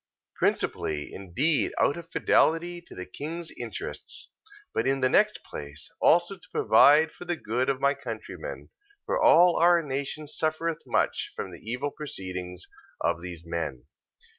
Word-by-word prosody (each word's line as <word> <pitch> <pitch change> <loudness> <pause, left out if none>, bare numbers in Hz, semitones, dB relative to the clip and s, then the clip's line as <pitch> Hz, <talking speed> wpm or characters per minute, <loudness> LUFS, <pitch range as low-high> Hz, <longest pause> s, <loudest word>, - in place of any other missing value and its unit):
Principally 75 -1 -1
indeed 130 - 0
out 140 - +3
of 170 -1 -9
fidelity 175 +2 +2
to - - -14
the 90 - -6
king's 160 - -6
interests, - - -7 0.4
but - - 0
in 135 0 +1
the 130 - +3
next - - +3
place 75 - -7
also 175 +4 +4
to - - -20
provide 155 +2 +6
for 175 - -11
the 175 0 -1
good 125 -2 -1
of 135 -1 0
my 140 +1 +3
countrymen: 120 - -7 0.3
for - - 0
all 175 - +6
our 170 0 +5
nation 140 +2 -4
suffereth 155 +2 -2
much - - 0
from - - -5
the - - -10
evil 125 +6 -3
proceedings 90 -11 -6 0.3
of 85 - 0
these 85 -2 -8
men. 80 -7 -4
140 Hz, 150 wpm, -27 LUFS, -, 0.4 s, provide